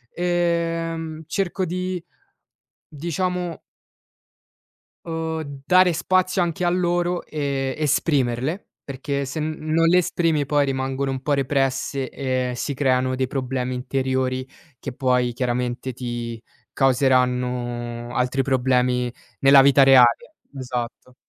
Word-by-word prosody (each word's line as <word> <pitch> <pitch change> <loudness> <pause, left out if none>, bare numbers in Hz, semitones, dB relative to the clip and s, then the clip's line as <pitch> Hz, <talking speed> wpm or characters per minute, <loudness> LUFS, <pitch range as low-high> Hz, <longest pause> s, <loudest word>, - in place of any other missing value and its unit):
ehm, 165 -2 -1
cerco 190 -1 -1
di 180 0 -3 0.9
diciamo 175 +3 -3 1.5
uhm 165 -1 -3 0.4
dare 185 +1 +5
spazio 185 +2 +1
anche 175 +1 -1
a - - +3
loro 175 0 0
e 140 -3 -2
esprimerle, 145 - 0 0.2
perché 140 +1 -3
se 140 +4 -5
non 155 +1 0
le 180 +2 +5
esprimi 165 -4 0
poi 145 0 +2
rimangono 135 0 -2
un 130 -1 -4
po' 145 - -2
represse 135 -1 0
e 130 -2 -2
si 140 - -2
creano 130 -1 +1
dei 130 0 -1
problemi 130 -1 -2
interiori 130 0 -1 0.3
che 135 - -6
poi 125 -1 +1
chiaramente 125 +1 -2
ti 120 -2 -5 0.3
causeranno 125 -2 0
altri 125 +2 +1
problemi 125 -2 +1 0.3
nella 135 0 +7
vita 140 0 +6
reale. 130 -3 +5 0.2
Esatto. 125 -1 -5
135 Hz, 110 wpm, -22 LUFS, 125-165 Hz, 1.5 s, nella